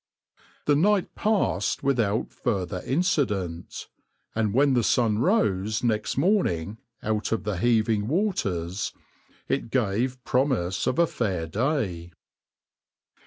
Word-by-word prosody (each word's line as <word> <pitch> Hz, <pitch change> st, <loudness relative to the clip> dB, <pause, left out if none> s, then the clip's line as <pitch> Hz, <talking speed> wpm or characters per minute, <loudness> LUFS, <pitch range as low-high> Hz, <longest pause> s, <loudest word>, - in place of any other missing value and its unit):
The 145 Hz, -, +4 dB
night 195 Hz, +5 st, +2 dB
passed 195 Hz, -, 0 dB
without 115 Hz, -6 st, +1 dB
further 95 Hz, -2 st, -2 dB
incident, 105 Hz, -, -1 dB, 0.5 s
and 110 Hz, -2 st, 0 dB
when 135 Hz, +4 st, +3 dB
the 120 Hz, -, +3 dB
sun 110 Hz, -2 st, +2 dB
rose 110 Hz, -, +1 dB
next 110 Hz, -1 st, 0 dB
morning 115 Hz, -, +1 dB, 0.2 s
out 110 Hz, 0 st, -1 dB
of 115 Hz, -, 0 dB
the 105 Hz, -2 st, -2 dB
heaving 110 Hz, 0 st, +2 dB
waters 100 Hz, -, -1 dB, 0.5 s
it -, -, -1 dB
gave 125 Hz, +2 st, 0 dB
promise 125 Hz, -9 st, 0 dB
of 130 Hz, -, 0 dB
a 170 Hz, -, +5 dB
fair 95 Hz, -, -2 dB
day. 95 Hz, -, -2 dB
110 Hz, 115 wpm, -26 LUFS, 95-135 Hz, 0.5 s, a